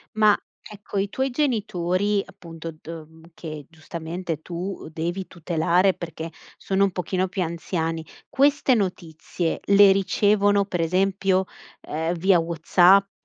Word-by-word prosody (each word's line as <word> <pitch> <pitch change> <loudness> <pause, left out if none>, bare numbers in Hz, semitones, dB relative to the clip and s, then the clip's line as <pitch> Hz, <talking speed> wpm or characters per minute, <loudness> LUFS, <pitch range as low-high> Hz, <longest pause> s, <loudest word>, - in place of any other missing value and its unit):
Ma 215 -1 +5 0.2
ecco, 205 -1 -8
i 195 +1 -1
tuoi 265 +5 -1
genitori 205 - 0
appunto, 165 -4 -9
do 160 -1 -9 0.3
che 155 -3 -8
giustamente 165 0 -6
tu 180 +2 -5
devi 175 +4 -3
tutelare, 175 +2 +1
perché 165 -1 -6 0.3
sono 195 0 0
un 200 - +2
pochino 185 +1 -1
più 185 +1 -4
anziani. 165 -1 -3 0.2
Queste 280 -1 +3
notizie, 175 -4 -3
le 200 0 +7
ricevono 200 +1 +2
pre 180 -4 -2
esempio, 190 +2 +1 0.4
ehm, 160 +3 -2
via 180 +1 +4
WhatsApp, 175 +4 +4
185 Hz, 120 wpm, -24 LUFS, 165-200 Hz, 0.4 s, le